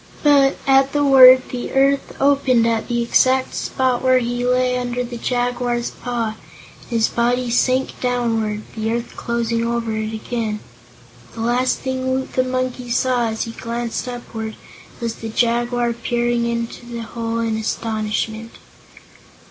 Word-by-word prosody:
But, 280 -2 +4
at 270 0 +4
the 290 0 +2
word, 260 -2 +8
the 245 -1 -5
earth 275 +1 +2
opened 275 -4 +3
at 230 -1 0
the 240 -1 0
exact 260 +2 +2
spot 255 -2 0
where 255 0 +4
he 245 0 -1
lay 250 0 +2
under 245 0 -2
the 240 0 -7
Jaguar's 245 -1 -1
paw, 230 -3 -3 0.4
and - - -18
his 230 -2 +2
body 245 +1 0
sank 255 +2 +1
downward, 225 -4 -1
the 220 0 -1
earth 235 0 -4
closing 230 -1 -1
over 230 -1 -1
it 220 0 -3
again. 220 -1 -3 0.8
The 225 - -5
last 245 +2 +1
thing 260 0 -2
Woot 260 0 -2
the 255 - +2
Monkey 255 -1 -3
saw, 245 -1 +1
as 220 0 -2
he 230 - -6
glanced 235 +1 -4
upward, 225 -3 -6 0.4
was 230 -2 -2
the 225 - -6
Jaguar 240 +1 +1
peering 240 0 -1
into 235 0 -4
the 235 -1 -6
hole 230 0 -4
in 225 -1 0
astonishment. 220 0 -3
240 Hz, 150 wpm, -20 LUFS, 230-255 Hz, 0.8 s, word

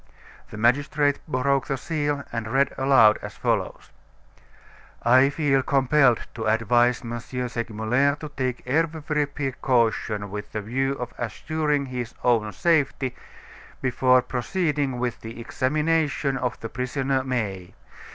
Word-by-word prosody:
The 105 - -9
magistrate 145 +5 +2
broke 135 -1 0
the 135 - -1
seal, 145 -1 -2
and 115 -2 -3
read 135 +5 +1
aloud, 130 -5 +5
as - - -8
follows: - - -2 1.1
"I 130 +3 +5
feel 145 -2 +1
compelled 135 -2 +3
to 110 -1 -4
advise 120 +3 +2
M. 120 0 -4
Segmuller 120 +2 -1
to 150 0 -8
take 130 -4 -3
every 150 +1 0
precaution 120 -7 -1
with 105 0 -7
the 110 - -2
view 135 +5 -1
of 125 -3 -6
assuring 150 +4 -1
his 125 -2 -5
own 115 -3 +2
safety 140 - +1 0.6
before 130 0 +3
proceeding 145 -1 -1
with 120 -1 -3
the 115 +1 -8
examination 150 +3 0
of 125 -3 -2
the 115 - -5
prisoner, 130 +2 -1
May. 105 -8 -3
130 Hz, 125 wpm, -24 LUFS, 120-145 Hz, 1.1 s, aloud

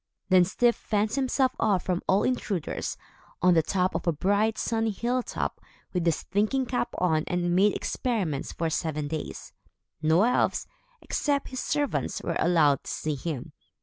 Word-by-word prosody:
Then 185 -2 +6
Styf 235 +6 +3
fenced 210 0 -1
himself 265 -1 +2
off 200 -5 +2
from 180 -1 -1
all 190 +2 +3
intruders, 205 -9 -2 0.4
on 180 0 +5
the 165 - +5
top 185 +3 0
of - - -3
a - - +5
bright, 205 +7 +1
sunny 225 0 0
hilltop, 240 +4 -2 0.3
with 175 -2 0
his 165 - +1
thinking 215 +7 0
cap 245 -1 -1
on 160 -4 +2
and 175 0 0
made 200 +2 +4
experiments 195 - -2
for 165 -1 -2
seven 155 -2 -2
days. 155 0 -6 0.5
No 160 +5 +4
elves, 245 +2 +2 0.4
except 285 -2 -1
his 255 - -5
servants, 290 0 -1
were - - -2
allowed 155 -6 +3
to - - -6
see 155 - -2
him. 145 -2 -5
190 Hz, 160 wpm, -27 LUFS, 165-235 Hz, 0.5 s, Then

